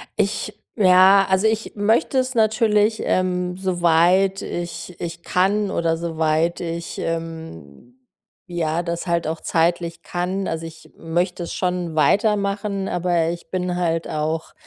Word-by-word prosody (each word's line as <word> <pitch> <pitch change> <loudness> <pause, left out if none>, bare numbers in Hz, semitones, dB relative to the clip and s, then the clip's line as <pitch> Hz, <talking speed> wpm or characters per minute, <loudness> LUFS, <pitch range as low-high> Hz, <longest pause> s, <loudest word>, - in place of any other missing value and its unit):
ich - - -1 0.2
ja, 190 0 +6
also, 190 +3 +3
ich 220 0 -1
möchte 220 +7 +1
es 255 0 +1
natürlich, 220 -1 +2
ähm, 180 -1 0
soweit 185 +1 +2
ich 175 0 -6
ich 170 0 -5
kann 195 +2 +1
oder 165 -1 0
soweit 160 0 0
ich, 170 0 -5
ähm, 145 - -6 0.5
ja, 170 -1 -1
das 170 +1 -3
halt 170 -2 0
auch 160 0 -3
zeitlich 170 0 0
kann. 185 +2 -3
Also, 165 0 -3
ich 160 0 -12
möchte 175 +2 -2
es - - -6
schon 180 -3 -2
weitermachen, 200 +3 +1
aber 175 -2 +1
ich 170 0 -7
bin 180 -1 -1
halt 165 -2 -1
auch, 155 +1 -3
175 Hz, 135 wpm, -21 LUFS, 165-195 Hz, 0.5 s, ja